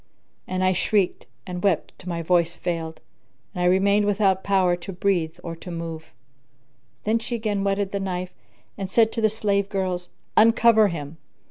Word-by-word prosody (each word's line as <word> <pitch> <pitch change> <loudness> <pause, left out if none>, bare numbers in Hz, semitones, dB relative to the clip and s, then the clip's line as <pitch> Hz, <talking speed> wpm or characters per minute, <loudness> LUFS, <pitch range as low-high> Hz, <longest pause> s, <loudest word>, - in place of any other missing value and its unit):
and 185 0 -1
I 185 0 +3
shrieked 195 0 0 0.2
and 180 -1 -5
wept 190 -5 +1
till 180 - -8
my 170 -1 -3
voice 170 0 +2
failed 165 -3 -4 0.5
and 180 - -4
I - - +2
remained 200 +3 +3
without 195 -2 +2
power 190 -3 +3
to 175 +3 -8
breathe 175 -3 0
or 170 -1 -5
to 180 - -10
move. 165 -2 -5 1.0
Then 220 +2 +1
she 240 +1 -4
again 210 -3 -1
whetted 195 0 0
the 200 - -2
knife 185 -1 -3 0.5
and 195 -1 -3
said 225 +3 +4
to 230 - -3
the 220 - +4
slave 200 -2 0
girls, 185 -3 -2 0.3
"Uncover 225 -1 +6
him." 160 -3 -6
190 Hz, 170 wpm, -24 LUFS, 175-205 Hz, 1.0 s, Uncover